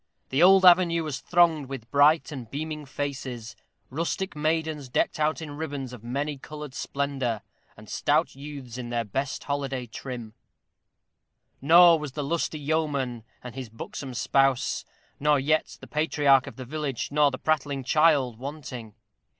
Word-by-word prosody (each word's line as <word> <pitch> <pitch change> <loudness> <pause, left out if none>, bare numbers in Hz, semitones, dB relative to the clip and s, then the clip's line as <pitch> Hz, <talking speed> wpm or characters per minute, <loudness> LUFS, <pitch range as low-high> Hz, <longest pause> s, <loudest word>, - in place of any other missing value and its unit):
The 135 +4 +1
old 190 +1 +7
avenue 175 -2 +6
was 150 -3 -4
thronged 165 -5 +3
with 125 -4 -7
bright 150 +3 +4
and 125 -6 -7
beaming 150 +1 -5
faces, 130 -5 -5 0.4
rustic 170 +6 -2
maidens 155 -2 -1
decked 125 - 0
out 155 +2 0
in 150 - -7
ribbons 140 -5 -5
of 120 -3 -10
many 140 +4 -3
colored 150 -1 -8
splendor, 135 -6 -2 0.3
and - - -13
stout - - +1
youths 135 -4 -8
in 120 -1 -6
their 120 -1 -1
best 130 +6 -3
holiday 135 -3 -3
trim; 120 -1 -7 1.3
nor 170 +3 +7
was 150 -3 -6
the 145 - -3
lusty 160 +1 -1
yeoman 145 -6 -1 0.2
and 125 -2 -8
his 130 -3 -7
buxom 125 +3 -7
spouse 135 +1 +1 0.3
nor 150 0 +3
yet 155 +3 0
the - - -10
patriarch 145 -3 +3
of - - -8
the 130 - -8
village, 140 -2 -3
nor 150 0 +4
prattling 140 0 -1
child, 140 -5 +3
wanting. 130 -6 -7
140 Hz, 150 wpm, -26 LUFS, 130-155 Hz, 1.3 s, old